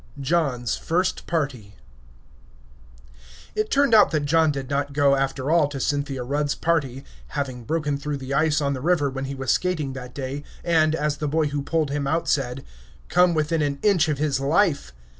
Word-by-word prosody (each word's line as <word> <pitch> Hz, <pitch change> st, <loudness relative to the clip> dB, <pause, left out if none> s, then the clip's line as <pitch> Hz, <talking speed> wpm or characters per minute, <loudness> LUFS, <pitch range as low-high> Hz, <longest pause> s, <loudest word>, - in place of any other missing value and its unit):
JOHN'S 135 Hz, -5 st, 0 dB
FIRST 180 Hz, +3 st, -1 dB
PARTY 130 Hz, -11 st, -3 dB, 1.8 s
It 430 Hz, 0 st, -1 dB
turned 280 Hz, -3 st, +3 dB
out 210 Hz, -2 st, +7 dB
that 155 Hz, -3 st, -1 dB
John 160 Hz, +1 st, +3 dB
did 135 Hz, -2 st, -5 dB
not 140 Hz, 0 st, -2 dB
go 140 Hz, -1 st, +4 dB
after 135 Hz, +1 st, -1 dB
all 165 Hz, -3 st, +4 dB
to 140 Hz, -1 st, -6 dB
Cynthia 140 Hz, -1 st, -1 dB
Rudd's 145 Hz, +3 st, -1 dB
party, 140 Hz, -6 st, -1 dB, 0.3 s
having 130 Hz, -4 st, -3 dB
broken 150 Hz, -2 st, -1 dB
through 145 Hz, 0 st, -3 dB
the 135 Hz, 0 st, -5 dB
ice 155 Hz, +1 st, +2 dB
on 140 Hz, -1 st, 0 dB
the 130 Hz, -, -5 dB
river 155 Hz, -3 st, +1 dB
when 135 Hz, 0 st, -4 dB
he 135 Hz, +1 st, -5 dB
was 135 Hz, -1 st, -1 dB
skating 160 Hz, -7 st, -1 dB
that 125 Hz, -2 st, -9 dB
day, 140 Hz, +1 st, -5 dB, 0.2 s
and, 160 Hz, -2 st, +3 dB
as 150 Hz, -2 st, -1 dB
the 150 Hz, -, -2 dB
boy 155 Hz, +1 st, +1 dB
who 145 Hz, 0 st, -2 dB
pulled 150 Hz, 0 st, -1 dB
him 145 Hz, -1 st, -2 dB
out 165 Hz, +4 st, 0 dB
said, 135 Hz, -1 st, -1 dB, 0.4 s
"come 180 Hz, 0 st, +4 dB
within 155 Hz, +1 st, 0 dB
an 145 Hz, -1 st, -1 dB
inch 180 Hz, -7 st, +3 dB
of 150 Hz, -, 0 dB
his 145 Hz, -2 st, 0 dB
life." 145 Hz, -, +1 dB
145 Hz, 185 wpm, -24 LUFS, 135-160 Hz, 1.8 s, out